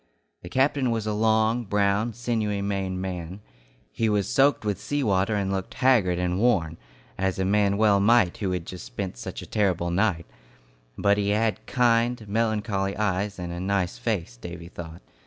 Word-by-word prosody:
The 90 - -9
captain 135 +2 +2
was 115 -2 -1
a 105 - -1
long, 110 +2 +2
brown, 105 +3 +1
sinewy 110 -4 -1
Maine 95 -2 -2
man. 90 0 -5 0.5
He 115 -1 0
was 105 -2 +1
soaked 135 -2 +3
with 105 -1 -2
sea 145 +5 -1
water 100 -1 +1
and 100 -1 -1
looked 95 +6 -4
haggard 110 -9 +3
and 90 +1 -1
worn, 90 -9 +2 0.4
as 95 -1 0
a 95 - 0
man 100 0 +2
well 105 -2 +4
might 105 -3 +4
who 100 - -2
had 90 -2 -2
just 90 0 -8
spent 95 -8 -5
such - - -7
a - - -8
terrible 90 -5 0
night; 90 -3 +1 0.7
but 100 0 +3
he 100 0 0
had 110 +1 0
kind, 120 -2 +2
melancholy 105 -2 -1
eyes, 100 -1 -1
and 90 -1 -5
a 85 - -5
nice 95 -1 -1
face, 85 - -2
Davy 85 +5 -8
thought. 85 -1 -9
100 Hz, 175 wpm, -25 LUFS, 95-110 Hz, 0.7 s, well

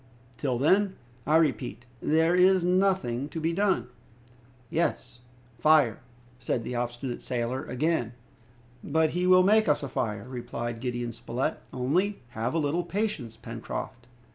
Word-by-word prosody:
Till 130 -3 -1
then, 190 +9 +3 0.3
I 155 - +4
repeat, 135 -6 +1 0.2
there 160 +2 +3
is 185 0 +5
nothing 180 -8 +1
to 165 - -5
be 165 +1 0
done." 195 -5 +1 0.8
"Yes, 130 -7 -1 0.4
fire!" 145 -4 +4 0.4
said 120 -1 -1
the 125 - -5
obstinate 120 +1 -3
sailor 125 +1 -2
again. 125 -2 0 0.7
"But 160 +1 +2
he 180 +3 0
will 185 0 +7
make 215 +3 +4
us 150 - +2
a - - -2
fire!" 105 -3 -3
replied 120 -2 -5
Gideon 120 -1 -3
Spilett, 120 +3 -3
"only 165 +9 0
have 115 +4 -3
a - - +3
little 160 +3 0
patience, 175 - -3
Pencroft!" 120 +1 -6
140 Hz, 140 wpm, -28 LUFS, 120-175 Hz, 0.8 s, will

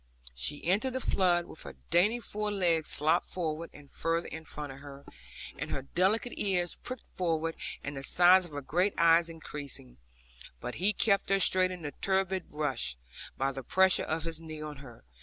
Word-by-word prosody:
She 105 - -2
entered 205 +9 +1
the 260 - -1
flood, 175 -7 +2
with 160 - -8
her - - -6 0.2
dainty 190 +7 +4
fore 210 -2 -2
legs 170 -5 +1
sloped 150 +2 +2
further 165 -2 -3
and 145 -1 -14
further 165 +1 0
in 160 0 -8
front 145 -2 -3
of 135 - -10
her, 140 0 -11 0.5
and - - -4
her 135 - -3
delicate 195 - +1
ears 180 -4 +1
pricked 255 -1 -8
forward, 165 -2 -1 0.3
and 145 - -5
the 135 - -5
size 180 +5 +6
of 165 - -4
her 145 - -4
great 180 +9 +1
eyes 170 0 +5
increasing, 145 - -8 0.6
but 125 - -5
he 200 +3 +5
kept 200 -1 +2
her 195 0 +3
straight 185 -1 +5
in 180 -2 -7
the 145 - -4
turbid 190 -1 +1
rush, 135 - -2 0.4
by 135 +1 +1
the 135 0 -6
pressure 190 +8 +4
of 160 0 0
his 165 -1 -2
knee 155 -1 -8
on 150 -1 -6
her. 130 -4 -13
165 Hz, 190 wpm, -30 LUFS, 145-185 Hz, 0.6 s, size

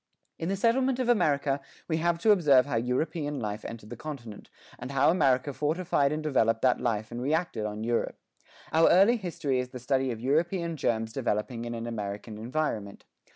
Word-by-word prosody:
In 165 - -2
the 195 - +1
settlement 245 +5 +2
of 255 -2 -1
America 145 - +2 0.3
we 160 - 0
have 170 +1 +1
to 220 - +5
observe 150 -10 +5
how 140 - -3
European 145 +5 -1
life 105 0 -4
entered 110 -2 -8
the - - -5
continent, 120 -9 -8 0.3
and 125 - -6
how 140 +2 +3
America 135 -5 +2
modified 150 -2 +1
and 155 +1 -2
developed 115 -7 +1
that 125 -1 +3
life 110 -2 -1
and 120 +1 -5
reacted 145 -6 -1
on 105 +1 -5
Europe. 120 +1 -1 0.6
Our 165 +1 +5
early 200 +7 +5
history 155 - -2
is 125 0 -3
the 125 - -8
study 130 +1 0
of 115 -3 -4
European 165 +6 0
germs 115 -5 -1
developing 115 -1 -2
in 120 0 -4
an 115 0 -5
American 105 -1 -5
environment. 115 -5 -3
135 Hz, 185 wpm, -28 LUFS, 115-160 Hz, 0.6 s, to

